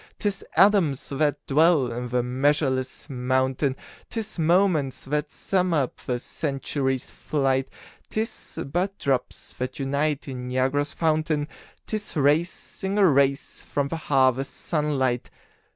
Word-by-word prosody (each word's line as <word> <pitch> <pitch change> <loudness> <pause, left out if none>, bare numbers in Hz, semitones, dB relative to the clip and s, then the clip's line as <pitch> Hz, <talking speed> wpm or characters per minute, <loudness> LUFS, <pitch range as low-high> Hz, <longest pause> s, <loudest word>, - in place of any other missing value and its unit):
'Tis 205 -3 -2
atoms 190 -9 +4
that 145 +1 0
dwell 150 -3 +4
in 120 +1 -4
the 125 0 +1
measureless 130 +1 0
mountain, 130 +1 0 0.3
'Tis 220 -4 -5
moments 165 -4 +2
that 150 +2 -1
sum 185 -3 0
up 140 -4 0
the 125 - -2
century's 135 -1 -2
flight; 135 -3 0 0.4
'Tis 220 -4 -4 0.2
but 190 +3 0
drops 135 -3 -2
that 125 +1 -3
unite 140 +2 -1
in 125 -2 -5
Niagara's 135 +3 0
fountain, 155 -2 +1 0.4
'Tis 215 -1 -4
rays, 150 +5 +4
single 195 +2 -2
rays, 140 -4 +2
from 140 -1 -2
the 165 - -2
harvest 135 -3 +2
sun 150 -3 -1
light. 125 -2 0
145 Hz, 125 wpm, -25 LUFS, 130-160 Hz, 0.4 s, atoms